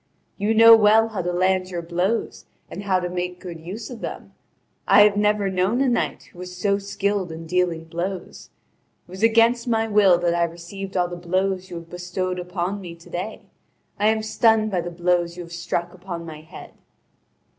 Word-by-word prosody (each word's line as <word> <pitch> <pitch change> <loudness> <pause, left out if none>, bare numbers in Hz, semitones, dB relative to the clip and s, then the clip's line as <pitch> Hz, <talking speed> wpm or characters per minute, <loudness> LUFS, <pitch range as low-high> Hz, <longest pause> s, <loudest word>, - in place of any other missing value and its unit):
You 210 +3 +1
know 230 +1 +9
well 220 +1 +5
how 215 -4 -3
to 175 0 -2
land 185 +1 +1
your 175 -2 -4
blows 180 +7 -2 0.3
and - - -6
how 190 -2 +2
to 180 - -3
make 180 0 -4
good 175 -3 -8
use 200 +9 -7
of 235 -3 -9
them: - - -7 0.5
I - - +7
have 205 -1 +4
never 210 -1 +2
known 190 +5 0
a 275 - +2
knight 245 - -1
who 175 - -15
was 180 0 -8
so 200 +2 +1
skilled 200 -2 -2
in 165 +1 -8
dealing 175 -1 0
blows. 170 - -6 0.6
It - - -17
was 190 +2 -8
against 230 +2 +4
my 225 -1 +1
will 205 -4 +5
that 175 -1 0
I 170 0 +2
received 180 +3 -7
all 180 -1 +2
the 175 - -6
blows 185 +2 -1
you 175 - -7
have 170 0 -9
bestowed 180 +1 -3
on 190 +2 -2
me 170 -3 -8
to 170 - -17
day; 185 +5 -5 0.6
I 210 - +3
am 220 0 +2
stunned 220 0 +2
by 180 -2 0
the 175 - -5
blows 175 0 0
you 175 - -5
have 170 - -13
I - - -8
struck 175 0 -3
upon 175 -2 -7
my 155 -2 -9
head." 160 - -12
185 Hz, 205 wpm, -23 LUFS, 175-205 Hz, 0.6 s, know